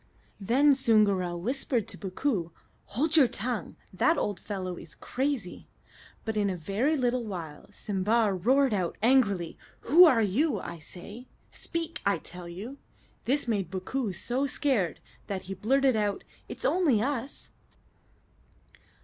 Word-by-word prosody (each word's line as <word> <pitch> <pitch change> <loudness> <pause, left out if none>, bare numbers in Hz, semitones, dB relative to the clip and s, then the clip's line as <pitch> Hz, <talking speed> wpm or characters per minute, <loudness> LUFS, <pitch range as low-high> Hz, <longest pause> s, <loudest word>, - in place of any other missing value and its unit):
Then 265 +8 +4
Soongoora 205 -8 +2
whispered 240 +3 -1
to - - -6
Bookoo, 190 - -1 0.4
"Hold 305 +8 0
your 290 -6 +7
tongue; 230 -4 -3 0.2
that 320 - +3
old 205 -4 -1
fellow 185 -3 -4
is 165 - -11
crazy." 260 -8 -3 0.6
But 220 - -2
in 205 -1 +1
a 185 - -3
very 215 - 0
little 250 -1 +1
while 170 -8 -7
Simba 210 +1 +1
roared 255 +7 +3
out 185 -4 -1
angrily: 210 -9 +2 0.2
"Who 335 +8 +8
are 245 -9 +5
you, 225 - +1
I 170 -2 -7
say? 205 +10 -10 0.2
Speak, 330 -1 -3
I 200 - +2
tell 180 0 -9
you!" 220 +11 -8 0.5
This 275 +1 +1
made 200 -7 0
Bookoo 200 +5 -3
so 245 +9 -2
scared 255 - 0 0.3
that 190 -2 -4
he 195 - -6
blurted 260 +6 +2
out, 205 -2 -1 0.3
"It's - - -6
only 320 - +3
us!" 265 +2 -3
220 Hz, 140 wpm, -28 LUFS, 190-265 Hz, 0.6 s, Who